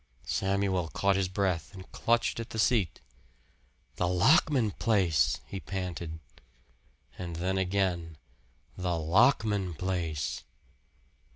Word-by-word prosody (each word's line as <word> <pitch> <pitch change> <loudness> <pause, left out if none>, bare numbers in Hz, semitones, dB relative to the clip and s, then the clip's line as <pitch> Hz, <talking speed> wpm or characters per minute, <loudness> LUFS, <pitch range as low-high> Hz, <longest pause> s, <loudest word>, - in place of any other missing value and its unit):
Samuel 95 -2 0
caught 100 +4 +1
his 95 -1 +1
breath 95 -2 -1
and 95 0 -11
clutched 115 0 +1
at 115 - -5
the - - -6
seat. 105 - +1 1.0
"The 90 - +1
Lockman 115 - +4
place!" 95 -8 +2
he 95 - -6
panted; 90 -4 -5 1.0
and 85 -2 -5
then 95 +3 -1
again, 90 -4 -1 0.6
"The 90 -2 -1
Lockman 100 - +2
place!" 85 -3 -2
95 Hz, 105 wpm, -29 LUFS, 85-100 Hz, 1.0 s, Lockman